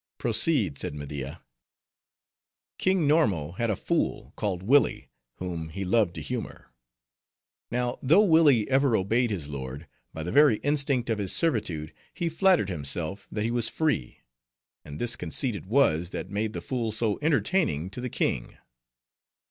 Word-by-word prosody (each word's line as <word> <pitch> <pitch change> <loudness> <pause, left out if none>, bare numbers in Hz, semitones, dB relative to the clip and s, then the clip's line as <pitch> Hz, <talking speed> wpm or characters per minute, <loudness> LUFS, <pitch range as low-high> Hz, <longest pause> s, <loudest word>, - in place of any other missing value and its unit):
"Proceed," - - +1
said 75 - -3
Media. 70 -1 -7 1.4
"King 185 -5 +2
Normo 95 - +1
had 115 -1 0
a 105 - +1
fool, - - -2
called 95 -4 -3
Willi, 140 +8 +2 0.3
whom 85 -3 -5
he 95 +4 -5
loved 100 -3 +2
to - - -5
humor. 125 - -6 1.0
Now, 120 0 -2
though 165 +11 +5
Willi 155 - +4
ever 135 -2 +3
obeyed 115 +5 +1
his 90 -9 -3
lord, 70 +2 -7 0.2
by 80 - -6
the 90 - -4
very 145 -5 +6
instinct 140 -4 +1
of 110 - -1
his 95 -2 +1
servitude, 105 - +1 0.2
he 170 - -1
flattered 175 - +3
himself 80 +3 -2
that 105 - -2
he 115 - -1
was 120 -2 +1
free; 150 - -2 0.6
and 75 0 -9
this 120 -1 +2
conceit 105 - -1
it 95 -2 -8
was, 90 - +2
that 95 - -6
made 105 +2 -2
the - - -5
fool 120 -4 -2
so 110 -1 -1
entertaining 150 - 0
to 125 - -6
the 125 - -3
king. - - -2
110 Hz, 155 wpm, -27 LUFS, 85-135 Hz, 1.4 s, very